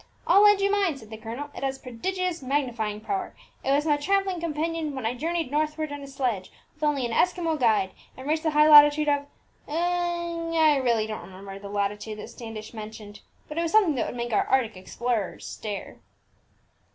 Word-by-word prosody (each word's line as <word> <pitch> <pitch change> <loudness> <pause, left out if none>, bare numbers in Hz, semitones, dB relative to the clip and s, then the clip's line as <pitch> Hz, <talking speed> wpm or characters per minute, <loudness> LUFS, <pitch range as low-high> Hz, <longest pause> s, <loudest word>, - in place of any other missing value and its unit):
'I'll 400 - +6
lend 415 -1 +7
you 395 0 +2
mine,' 390 -8 +1
said 220 -4 -14
the 220 - -6
colonel; 235 +7 -6
'it - - -7
has 270 0 -1
prodigious 350 +8 -3
magnifying 245 -6 -1
power. 385 - -3 0.3
It - - -2
was 290 +2 +3
my 295 -2 +3
travelling 385 +3 0
companion 325 -1 -2
when 265 - -4
I 225 - +1
journeyed 325 +2 -2
northward, 305 0 -1
in 290 0 -6
a 275 - -8
sledge, 250 -9 -2 0.2
with 305 - -30
only 290 -4 +1
an 235 - -3
Eskimo 335 +3 +1
guide, 215 -6 +3 0.3
and 260 +1 -8
reached 310 +1 +1
the 315 - +1
high 300 0 +5
latitude 295 0 +8
of' 285 -1 +1 0.4
I 335 -2 +1
really 230 -3 +2
don't 215 0 -5
remember 195 +1 -10
the 200 0 -9
latitude 205 +1 -2
that 215 - -8
Standish 225 -2 -8
mentioned, 215 -1 -9 0.3
but 300 +2 -4
it - - +2
was 335 -1 -2
something 410 -8 +5
that 245 -5 -1
would - - -6
make 240 -1 -3
our - - +2
Arctic 245 -5 +2
explorers 215 +2 -3
stare." 205 -3 -6
285 Hz, 195 wpm, -26 LUFS, 225-330 Hz, 0.4 s, latitude